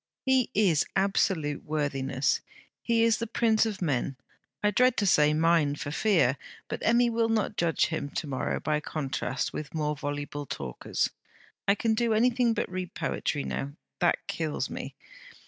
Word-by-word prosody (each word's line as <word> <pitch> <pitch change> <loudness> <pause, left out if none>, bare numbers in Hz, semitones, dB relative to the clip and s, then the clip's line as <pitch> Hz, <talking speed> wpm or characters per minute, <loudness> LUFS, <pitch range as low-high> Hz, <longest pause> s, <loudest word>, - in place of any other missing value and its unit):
'He 260 -2 +3
is 180 -7 +4
absolute 190 -6 +1
worthiness. 140 -3 0 0.4
He 230 -1 +2
is 230 -2 +3
the 230 - -2
prince 225 -1 +2
of 200 -4 -4
men: 140 -3 0 0.5
I 210 - +4
dread 250 +4 +3
to 205 - +1
say, 150 -5 +5
mine! 155 -2 +3
for 145 0 -5
fear. 165 - +2 0.3
But - - -4
Emmy 235 +1 +3
will 230 0 +1
not 220 -1 0
judge 170 -3 +2
him 155 -3 -3
to - - -1
morrow 135 -3 -2
by 150 -1 0
contrast 135 -4 -3
with 155 +1 -6
more 150 -1 0
voluble 145 0 -4
talkers. 65 - -2 0.6
I 200 - +5
can 225 +2 +1
do 230 0 +1
anything 235 0 +3
but - - -1
read 185 -1 -5
poetry 145 -2 -2
now. 140 +1 -4 0.3
That 175 - +1
kills 155 -2 -3
me! - - -6
170 Hz, 165 wpm, -28 LUFS, 145-220 Hz, 0.6 s, say